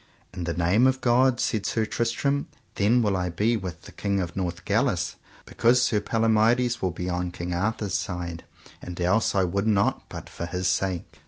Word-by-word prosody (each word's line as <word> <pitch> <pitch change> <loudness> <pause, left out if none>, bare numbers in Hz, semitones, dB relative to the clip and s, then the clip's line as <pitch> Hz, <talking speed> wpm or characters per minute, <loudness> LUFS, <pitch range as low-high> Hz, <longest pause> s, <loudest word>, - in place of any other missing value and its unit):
In 90 -2 -5
the 85 -1 -2
name 90 +9 +3
of 130 0 +1
God, 125 0 +3
said 110 -3 0
Sir 110 -1 0
Tristram, 120 +6 -1 0.3
then 115 +4 +3
will 100 -2 +1
I 90 -1 -1
be 105 +7 +1
with 90 -5 -6
the - - -12
King 100 -1 -1
of 85 -3 -4
Northgalis, 90 -2 -1 0.3
because 125 +2 +3
Sir 110 -3 +2
Palomides 115 +3 +2
will 95 - +1
be 90 +1 -5
on 90 0 -1
King 85 0 -5
Arthur's 100 +1 -1
side, 85 -4 -3 0.4
and 90 0 -8
else 95 +6 +2
I 95 - +3
would 100 +4 -1
not 100 -2 +1
but - - -8
for 85 - -6
his 90 +1 -2
sake. 95 -3 -2
100 Hz, 185 wpm, -25 LUFS, 90-115 Hz, 0.4 s, name